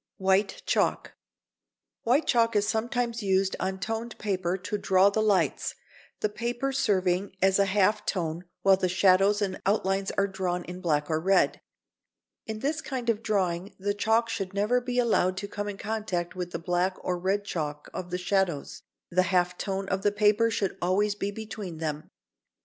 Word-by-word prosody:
[Sidenote: 190 - -14
White 195 +1 +2
chalk.] - - 0 0.9
White 260 +7 +2
chalk 230 -2 +2
is 205 0 +2
sometimes 235 +1 -1
used 190 -1 +1
on 190 0 -2
toned 225 +3 -4
paper 185 -3 -1
to 205 +3 -3
draw 190 +1 +4
the 220 - +1
lights, 205 -3 +1 0.5
the - - +2
paper 240 +5 -2
serving 195 -7 +1
as 190 +1 +3
a 200 - +5
half 200 +1 +2
tone 170 -1 -2 0.2
while 195 -1 +6
the 185 -1 0
shadows 195 +3 +4
and 190 -2 -3
outlines 195 -1 +1
are 195 - +4
drawn 185 -2 -2
in 180 +1 -8
black 150 -4 +1
or 155 -1 0
red. 190 +3 +2 0.9
In 220 -1 -5
this 300 +3 -1
kind 245 -3 -1
of 220 -1 -4
drawing 190 -3 -1
the 205 +1 -1
chalk 220 +3 +2
should 195 -3 -4
never 215 +5 +2
be 245 0 -3
allowed 200 -6 +2
to 200 +1 -4
come 205 0 -4
in 200 - -6
contact 205 -6 -3
with 180 -1 -4
the - - -4
black 180 +2 0
or 180 -1 -2
red 195 +3 0
chalk 150 -5 -4
of 180 - -5
the 180 - -2
shadows, 180 -4 -1 0.3
the 185 +1 +4
half 180 -1 +2
tone 195 +1 -3
of 190 0 0
the 205 0 +2
paper 210 +2 +3
should 200 -4 -2
always 200 +4 +2
be 200 -1 -3
between 205 -4 -7
them. 155 -1 -4
195 Hz, 180 wpm, -27 LUFS, 185-215 Hz, 0.9 s, while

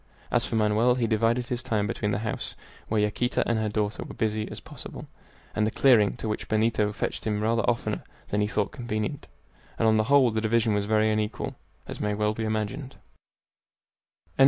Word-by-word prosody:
As - - +3
for - - -3
Manoel, 110 +3 +3
he 125 -2 +1
divided 115 +2 +2
his 125 -1 -1
time 105 -2 0
between 105 0 -2
the 100 - 0
house, 110 - -4 0.3
where 110 - +1
Yaquita 105 +4 0
and 115 -1 +1
her 110 -1 0
daughter 105 0 -1
were - - -9
as - - -21
busy 110 -1 -1
as - - -5
possible, - - -8 0.5
and 110 0 +1
the - - +2
clearing, 110 -4 +4
to - - -5
which 105 - -3
Benito 110 -1 +2
fetched 105 - -3
him 105 -1 0
rather 115 +2 +2
oftener 120 -1 -1 0.3
than 105 - +1
he 105 - +2
thought 105 -1 -1
convenient, 120 +3 -3 0.5
and 115 - +2
on 110 0 +5
the 110 - +2
whole 135 -1 +5
the 110 0 -1
division 110 0 +2
was 105 0 0
very 110 0 +3
unequal, 105 0 -2 0.3
as - - -6
may 105 0 0
well 105 0 +1
be 110 +1 -3
imagined. 110 +6 -3
110 Hz, 200 wpm, -27 LUFS, 105-115 Hz, 0.5 s, on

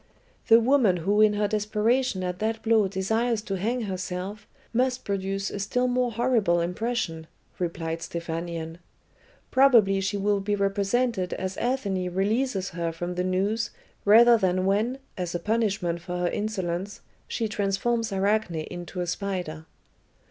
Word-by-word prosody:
"The 225 -1 +8
woman 235 -6 +3
who 200 +5 +2
in 215 -1 +5
her 205 0 +1
desperation 215 +1 0
at 180 0 -3
that 220 +1 -2
blow 220 -3 +4
desires 220 +4 0
to 195 -2 -3
hang 235 +7 -1
herself, 190 +1 -5 0.3
must 255 +1 0
produce 195 0 -2
a 205 - -5
still 250 +6 0
more 250 -1 +1
horrible 225 -7 +2
impression," 175 -2 -2 0.3
replied 165 -2 -3
Stephanion. 165 -1 -5 0.7
"Probably 230 -8 +5
she 195 +1 -1
will 200 0 +1
be 205 +1 -1
represented 200 +1 0
as 190 0 -3
Athene 200 -8 -1
releases 205 0 0
her 170 -1 -3
from 175 +2 -4
the 180 0 -1
noose 195 +5 0 0.3
rather 230 +3 +7
than 185 -1 +1
when, 215 +7 +1 0.2
as 175 -1 -3
a - - 0
punishment 200 -4 0
for 180 +1 -4
her 175 0 0
insolence, 200 -2 -3 0.3
she 225 - -2
transforms 215 +3 -1
Arachne 195 -1 +1
into 175 +3 -5
a - - -1
spider." 175 -4 -4
200 Hz, 145 wpm, -26 LUFS, 180-225 Hz, 0.7 s, The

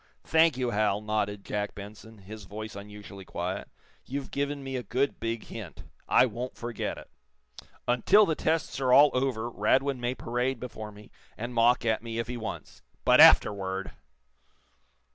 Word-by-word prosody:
"Thank 160 -3 +3
you, 125 -2 -1
Hal," 105 -1 +1
nodded 105 -1 -2
Jack 105 0 -3
Benson, 105 +2 -11
his 105 +1 -11
voice 110 +2 -7
unusually 100 -1 -10
quiet. 90 +1 -5 0.3
"You've 135 +1 -6
given 140 0 -2
me 135 0 -5
a 125 - -2
good, 130 +3 -1
big 115 0 -3
hint. 100 -10 -9 0.2
I - - +5
won't 125 +2 -5
forget 120 -1 -4
it. - - -11 0.8
Until 185 - +5
the 165 - 0
tests 160 -1 -1
are 130 -2 +1
all 145 +3 +7
over 125 -3 -1
Radwin 130 +4 +1
may 120 +1 -2
parade 125 +1 -2
before 110 -3 -7
me, 105 0 -15 0.3
and 120 +2 -5
mock 120 +1 +3
at 110 -1 +1
me, 115 -1 -6
if 115 - -1
he 125 - -4
wants. 115 -2 -7 0.2
But - - +7
afterward 95 -1 +5
115 Hz, 160 wpm, -28 LUFS, 105-130 Hz, 0.8 s, all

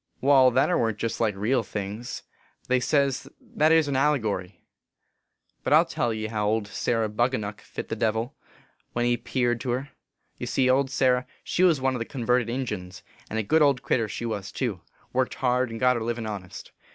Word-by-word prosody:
" - - -43
Wai, 135 -1 +6
that 130 +2 +3
ere 180 - +1
warn 110 -2 +1
t - - -12
jest 115 - -3
like 110 -3 +1
real 115 +6 +1
things: 105 +2 -5 0.4
they 130 0 +3
say 140 +2 +3 0.3
that 155 +2 +1
ere 165 - +7
s 160 -2 +2
an 140 - -1
allegory. 110 - 0 1.0
But - - +1
I - - +9
ll - - +3
tell 115 - -1
ye 110 -1 -3
how 105 -1 -1
old 110 0 +1
Sarah 115 +2 -1
Bunganuck 105 -2 -1
fit - - -7
the - - -2
Devil, 110 +3 -1 0.6
when 120 0 0
he 120 0 +3
peared 120 0 -1
to 130 - -4
her. 130 +4 -2 0.5
Ye - - -4
see, 130 - +2
old 135 +1 +2
Sarah 130 -2 +2 0.2
she - - -1
was 175 -6 +5
one 130 0 +1
of 125 - -3
the 115 - -3
con 125 -2 -6
verted 125 -1 +2
Injuns, 105 -8 -4 0.3
and 110 - -3
a 110 - 0
good 160 +10 +3
old 140 -4 +3
critter 115 -5 +1
she 120 - -4
was 105 -4 -4
too; 110 -10 -3 0.3
worked* 130 0 0
hard, 125 -1 +1
and 115 0 -6
got 125 0 +3
her - - -4
livin 115 0 -3
honest. 100 -4 -7
120 Hz, 215 wpm, -26 LUFS, 110-130 Hz, 1.0 s, I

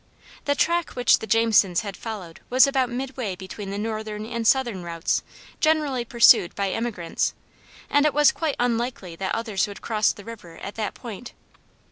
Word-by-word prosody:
The 285 - +2
track 340 +3 0
which 245 -1 +4
the 220 - -7
Jamesons 215 -5 +3
had 200 -2 -6
followed 200 -8 -7
was 255 +3 +6
about 265 -3 +1
midway 250 -5 -4
between 190 +2 -8
the 200 - -4
northern 215 0 -4
and 230 -1 -2
southern 240 -8 +2
routes 170 -1 -1 0.4
generally 300 -5 +1
pursued 230 -7 +5
by 195 -1 -1
emigrants, 215 -8 -2 0.5
and 290 - +3
it 300 - 0
was 295 0 +6
quite 315 -4 -2
unlikely 235 -7 -1
that 190 +1 -2
others 220 -4 -1
would 205 - -10
cross 215 -2 +2
the 205 - -12
river 200 -8 -10
at 200 - -7
that 220 -2 -4
point. 235 0 -9
225 Hz, 170 wpm, -24 LUFS, 200-250 Hz, 0.5 s, was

